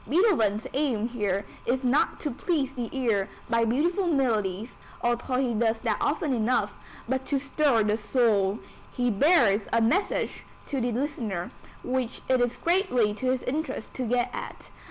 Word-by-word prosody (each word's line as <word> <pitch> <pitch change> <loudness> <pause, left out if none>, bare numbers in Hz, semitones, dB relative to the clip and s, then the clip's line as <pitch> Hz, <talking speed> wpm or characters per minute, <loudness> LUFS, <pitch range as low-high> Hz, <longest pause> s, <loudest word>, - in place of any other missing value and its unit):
Beethoven's 255 - +3
aim 250 -6 0
here 205 -4 -1 0.2
is 255 +2 0
not 255 +3 +2
to 295 - -2
please 275 0 -1
the 245 -4 -4
ear 225 -7 0 0.2
by 230 0 +2
beautiful 340 - +1
melodies, 225 - 0 0.2
although 240 +2 0
he 250 -2 +1
does 225 0 +1
that - - 0
often 295 -5 0
enough, 220 -3 +1 0.3
but 260 +2 -1
to 280 - +1
stir 275 -3 +2
the 210 0 +1
soul. 210 -3 +2 0.3
He 245 -1 0
bears 225 - +4
a 230 - +3
message 320 - 0 0.2
to 275 -3 -2
the 240 +1 0
listener, 230 - -3 0.3
which 255 -1 -2
it 260 -1 +3
is 245 0 0
greatly 335 - +2
to 235 +5 -3
his 255 -1 0
interest 300 -4 -3
to 255 - -3
get 245 +1 +1
at. - - -7
245 Hz, 160 wpm, -27 LUFS, 220-275 Hz, 0.3 s, bears